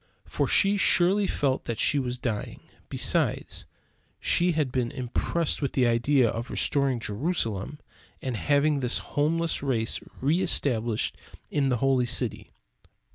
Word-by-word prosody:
For - - -1
she 200 +1 +3
surely 195 +1 +3
felt 135 -2 -1
that 115 - -3
she 145 - +2
was 125 -2 -3
dying. 115 -4 -4 0.3
Besides, - - +1 0.5
she 175 0 +2
had 150 -5 -1
been 125 -2 -1
impressed 140 +7 -2
with 140 - -2
the 130 - +2
idea 120 +2 +2
of 115 +3 -4
restoring 140 -3 +1
Jerusalem 115 - -3 0.4
and 130 -3 -4
having 145 +4 +1
this 125 -2 +2 0.2
homeless 160 +2 0
race 120 -5 +1 0.2
re 155 +7 +1
established 115 - +1 0.3
in 140 -2 +1
the 125 - +1
holy 130 0 +1
city. 120 -1 -2
135 Hz, 135 wpm, -26 LUFS, 120-150 Hz, 0.5 s, she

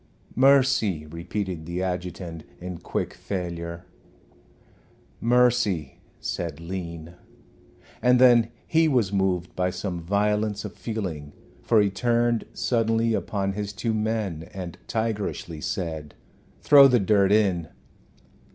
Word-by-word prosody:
"Mercy," 130 - +3
repeated 85 +1 -5
the 90 +2 -2
adjutant, 90 -3 -4 0.2
in 90 -1 -6
quick - - -3
failure. 85 -3 -5 1.3
"Mercy," 115 - +2 0.2
said 80 -4 -4
Lean. 85 -1 -6 0.9
And 125 0 +4
then 120 -3 +6 0.2
he 160 0 +3
was 120 -9 +1
moved 95 -3 0
by 90 0 +1
some 90 -1 -4
violence 105 +3 0
of 105 - -6
feeling, 90 -11 -5 0.3
for 115 - +3
he 100 -1 +3
turned 120 +1 +1
suddenly 115 -1 +1
upon 100 -2 -1
his 105 0 -4
two 115 +2 -2
men 105 -7 -2
and 90 -3 -7
tigerishly 105 -8 -3
said, 80 -6 -4 0.5
"Throw 140 -2 +9
the 125 -2 +4
dirt 100 -1 +3
in." 95 -6 +2
100 Hz, 115 wpm, -25 LUFS, 85-115 Hz, 1.3 s, Throw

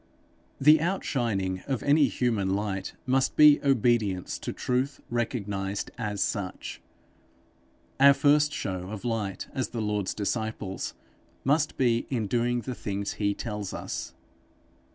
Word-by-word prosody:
The 150 +2 +6
outshining 115 - -1
of 135 -4 -2
any 145 +1 +5
human 115 -4 0
light 100 -2 -3
must 130 +1 +1
be 150 -1 +7
obedience 120 -8 +1
to - - -4
truth 130 +2 -1
recognized 105 -4 -2
as 105 -4 -1
such; 100 -4 -4 1.2
our 140 0 +8
first 150 +1 +4
show 95 -8 -4
of 110 +2 -7
light 105 -5 -2
as 130 -3 -1
the 120 - -5
Lord's 105 -3 -1
disciples 105 -3 -3 0.5
must 150 +3 +1
be 120 -3 +2
in 120 -5 -1
doing 120 +3 0
the 125 +3 -4
things 100 -3 -3
he 100 0 +1
tells 105 -4 -4
us. - - -5
115 Hz, 130 wpm, -27 LUFS, 100-130 Hz, 1.2 s, our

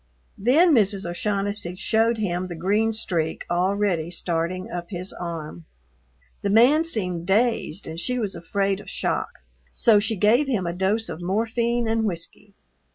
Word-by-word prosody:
Then 300 - +5
Mrs. 200 -6 +2
O'Shaughnessy 200 0 -2
showed 225 +3 +1
him 185 -4 -2
the 175 - -6
green 205 +6 +1
streak 170 -8 -2
already 180 -2 +1
starting 175 +1 -2
up 175 -1 -5
his 185 -1 -4
arm. 155 - -6 0.8
The 200 - -1
man 255 +10 +5
seemed 180 - -1
dazed 220 0 +1
and 160 +1 -6
she 250 +7 -1
was 210 -5 -2
afraid 195 +3 -1
of - - -11
shock, - - -1 0.4
so 220 -3 +4
she 220 +2 -1
gave 220 +8 +3
him 220 -9 0
a 170 - -2
dose 195 +5 0
of 165 0 -7
morphine 230 +5 0
and 225 0 +1
whiskey. 200 +2 -6
200 Hz, 155 wpm, -24 LUFS, 175-225 Hz, 0.8 s, Then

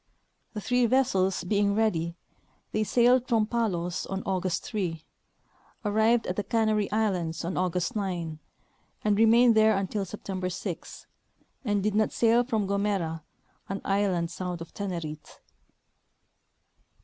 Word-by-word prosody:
The 210 - -4
three 245 +2 +2
vessels 215 -7 +2
being 200 +2 +1
ready, 170 -7 0 0.6
they 215 - +1
sailed 245 +3 +3
from 225 -4 +3
Palos 185 -7 -1
on 195 0 -4
August 185 -2 -1
3, 175 -7 -3 0.8
arrived 220 +3 +3
at 180 - -2
the 205 - 0
Canary 215 -1 +1
islands 180 -7 -1
on 175 - -3
August 180 0 -1
9, 175 -6 -3 0.6
and 210 -1 +3
re 225 +2 +5
mained 235 +1 +6
there 220 -1 +4
until 195 +1 -2
September 185 -1 -4
6, 180 -1 -6 0.6
and 205 -5 0
did 215 0 +1
not 215 +1 +2
sail 235 +1 +3
from 225 -5 -1
Gomera, 195 -5 -1 0.5
an 195 +1 -3
island 190 -4 +1
south 180 -1 -4
of 165 0 -9
Tenerite. 170 -6 -5
200 Hz, 135 wpm, -27 LUFS, 180-220 Hz, 0.8 s, mained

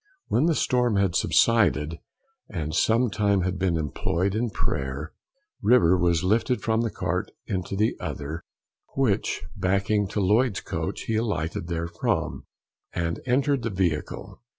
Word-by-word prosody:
When 145 +7 +3
the 165 - +2
storm 125 -5 +2
had 100 -3 +2
subsided, 85 -9 +3 0.5
and 80 -5 -4
some 115 +6 +3
time 100 -2 +2
had 90 0 -2
been 90 -3 +1
employed 85 +5 -1
in 115 +2 0
prayer, 70 -4 -3 0.5
River 105 -5 +5
was 85 -2 +2
lifted 115 +6 +1
from 110 -1 +1
one 115 - 0
cart - - -2 0.2
into 95 0 -3
the 105 +3 +1
other, 75 +4 -5 0.5
which 115 -7 +1
backing 100 +2 +1
to 105 - -3
Lloyd's 105 +3 +2
coach, - - -4
he 110 - -1
alighted 85 -7 -2
therefrom, 85 0 -2 0.5
and 85 -1 -2
entered 135 +1 +2
the 115 - -2
vehicle. 90 -6 -2
100 Hz, 140 wpm, -26 LUFS, 85-115 Hz, 0.5 s, River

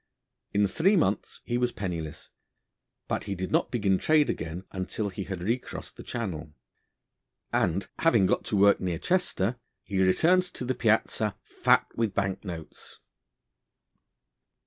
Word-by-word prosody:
In 100 0 +3
three 170 - +3
months 105 - 0
he 120 0 0
was 125 0 +1
penniless, 85 -5 -5 0.8
but - - -2
he 100 -1 -3
did 95 0 -4
not - - +2
begin 100 -6 +1
trade 155 -2 +4
again 80 +3 -5
until 100 +2 -3
he 95 0 -5
had 95 -3 -5
recrossed 115 +6 -3
the - - -10
Channel, 80 -10 -5 1.0
and, 90 +3 +1
having 115 -12 +4
got - - +1
to - - -1
work 100 +1 +6
near 90 -3 -1
Chester, 125 - 0 0.3
he 95 -2 -1
returned 170 - +4
to 125 - -4
the 130 - 0
Piazza 110 -2 +1
fat - - +3
with 110 -4 -1
bank 95 -1 -1
notes. 85 -5 -9
100 Hz, 145 wpm, -28 LUFS, 95-120 Hz, 1.0 s, work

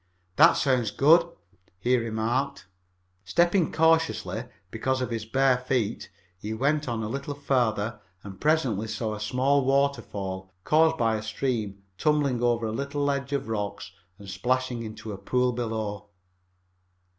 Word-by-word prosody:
"That - - +7
sounds 125 -5 +1
good," 165 +9 +5 0.5
he 125 +6 +2
remarked. 115 +4 -1 0.6
Stepping 175 - +2
cautiously, 160 0 +1 0.3
because 130 +4 -1
of 125 -2 -3
his 115 -2 -3
bare 130 +1 +3
feet, 125 -4 -2 0.3
he 110 +3 -4
went 145 +5 0
on 115 -2 -2
a - - -2
little 140 +5 -4
farther 120 -6 0 0.2
and 95 -1 -10
presently 130 -9 +1
saw 110 0 -3
a 105 - -6
small 130 +6 +1
waterfall, 105 -9 -1
caused 160 +1 +3
by 115 -2 +1
a - - -5
stream 110 -3 -3 0.2
tumbling 145 -5 +1
over 120 -1 +1
a 110 - -2
little 140 +4 -3
ledge 140 0 -1
of 140 -1 -2
rocks 100 -3 -4 0.3
and 100 -1 -12
splashing 120 +5 -1
into 110 -1 -7
a 100 - -8
pool 125 +5 +1
below. 110 -4 -4
120 Hz, 145 wpm, -26 LUFS, 110-140 Hz, 0.6 s, That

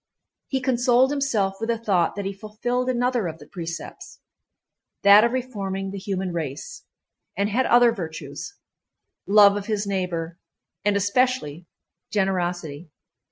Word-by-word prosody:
He 265 -1 -1
consoled 255 0 +3
himself 225 -9 0
with 225 +1 -3
the 230 - +1
thought 195 -7 +1
that 200 -1 -4
he 195 - -2
fulfilled 235 +5 -3
another 245 -4 0
of 160 -1 -6
the - - -14
precepts—that 195 +3 -1
of 235 - +2
reforming 200 -7 -3
the 200 - -6
human 190 -2 -3
race—and 170 - -6
had 250 +5 +1
other 240 0 +6
virtues—love 200 - -1
of 205 -1 -4
his 210 -2 -1
neighbor, 180 -4 -3 0.4
and 205 0 +2
especially 200 - 0 0.4
generosity. 175 -5 -2
200 Hz, 120 wpm, -24 LUFS, 180-240 Hz, 0.4 s, other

